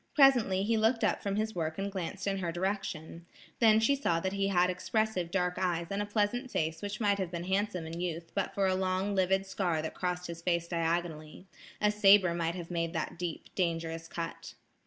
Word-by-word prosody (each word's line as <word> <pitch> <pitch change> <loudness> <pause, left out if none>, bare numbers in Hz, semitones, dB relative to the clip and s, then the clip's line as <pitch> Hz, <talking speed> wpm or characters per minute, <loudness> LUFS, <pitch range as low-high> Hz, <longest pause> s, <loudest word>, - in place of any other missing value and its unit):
Presently 245 -10 +5
he 225 +2 +2
looked 225 +2 +2
up - - +1
from 200 -1 -2
his 215 +1 -1
work 160 -2 -2
and 200 +1 -2
glanced 195 +1 -4
in 195 -1 0
her 175 -2 -2
direction; 175 -2 -3 0.3
then 220 -2 +6
she 250 +6 +3
saw 170 -12 +1
that 190 +3 -2
he 195 0 0
had 180 -2 +3
expressive 185 -1 -1
dark 180 0 0
eyes 170 -2 0
and 200 +1 -1
a 205 - -3
pleasant 215 +5 0
face 160 -6 -1
which 205 +1 -4
might 200 -3 +2
have 185 -3 -1
been 170 -1 -4
handsome 190 -2 -1
in 165 +1 -6
youth, 170 -2 -4
but 200 - -2
for 195 - +2
a 190 - +3
long 185 +2 0
livid 190 0 +2
scar 180 -4 -1
that 160 - -4
crossed 180 -1 -2
his 170 -1 -7
face 170 -1 0
diagonally. 165 -1 -2 0.3
A 210 0 +3
sabre 200 -4 +6
might 170 0 -1
have 175 -1 -7
made 165 -1 -1
that 165 0 -3
deep, 175 -3 -5
dangerous 165 -2 -2
cut. 165 0 -6
185 Hz, 210 wpm, -31 LUFS, 170-200 Hz, 0.3 s, then